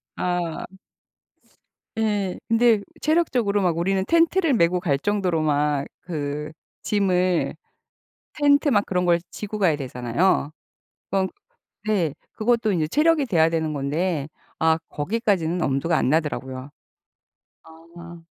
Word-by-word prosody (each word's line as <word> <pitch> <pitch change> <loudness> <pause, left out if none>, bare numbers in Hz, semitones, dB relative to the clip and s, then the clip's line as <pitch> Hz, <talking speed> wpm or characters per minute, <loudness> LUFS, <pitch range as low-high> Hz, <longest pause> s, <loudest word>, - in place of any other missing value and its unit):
아. 175 -2 -2 1.3
예, 205 -4 -1
근데 230 -2 +4 0.2
체력적으로 255 -11 +1
막 175 -3 +1
우리는 190 +2 +1
텐트를 335 - +3
메고 180 -3 +3
갈 150 -6 0
정도로 185 -4 0
막 145 -2 +1 0.2
그 150 -2 -4 0.3
짐을 185 -3 +1 0.8
텐트 290 0 +3
막 205 -3 +3
그런 180 -1 0
걸 170 -1 +3
지고 210 0 -6
가야 175 -7 +3
되잖아요. 135 +5 0 0.6
그건 190 -1 +1 0.6
네, 185 -9 +1 0.2
그것도 230 -1 +1
이제 160 -4 +1
체력이 300 - +3
돼야 165 -6 +3
되는 160 -2 -1
건데 150 +2 -1 0.3
아 160 0 +3
거기까지는 180 -1 -1
엄두가 140 +5 +1
안 - - +1
나더라고요. 135 -3 -2 0.9
아. 170 +1 -13
180 Hz, 240 characters per minute, -23 LUFS, 155-210 Hz, 1.3 s, 근데